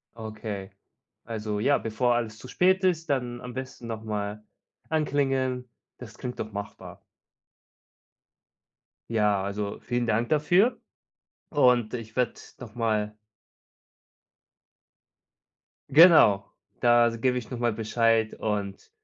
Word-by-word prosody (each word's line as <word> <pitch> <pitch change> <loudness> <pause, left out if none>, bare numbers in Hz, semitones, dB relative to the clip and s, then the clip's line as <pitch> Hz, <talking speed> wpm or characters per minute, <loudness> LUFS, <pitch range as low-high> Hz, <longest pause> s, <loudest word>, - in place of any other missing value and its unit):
Okay, 110 -3 -6 0.5
also 105 -2 -4
ja, 140 +7 +3
bevor 120 +2 0
alles 115 -2 -2
zu - - -11
spät 185 +6 +2
ist, 165 -3 +1
dann 125 -3 -2
am 125 -1 -8
besten 130 -2 -7
noch 110 -1 -5
mal 105 0 -4 0.5
anklingeln. 135 -4 0 0.3
Das - - -11
klingt 125 0 -6
doch 110 -1 -5
machbar. 100 0 -8 2.1
Ja, 105 -3 +2
also 100 0 -4
vielen 120 -1 -2
Dank 115 +2 +1
dafür 190 - +3 0.7
und 125 -6 +3
ich 115 -2 -6
werde 125 -2 0 0.2
noch 115 -4 -10
mal 110 -2 -1 2.8
Genau, 145 - +7 0.4
da 120 -1 +5
s 115 -1 -8
gebe 125 0 +2
ich 110 -4 -9
noch 125 - -5
mal 120 -1 +1
Bescheid 115 0 +1
und 105 - -4
115 Hz, 115 wpm, -26 LUFS, 110-130 Hz, 2.8 s, Genau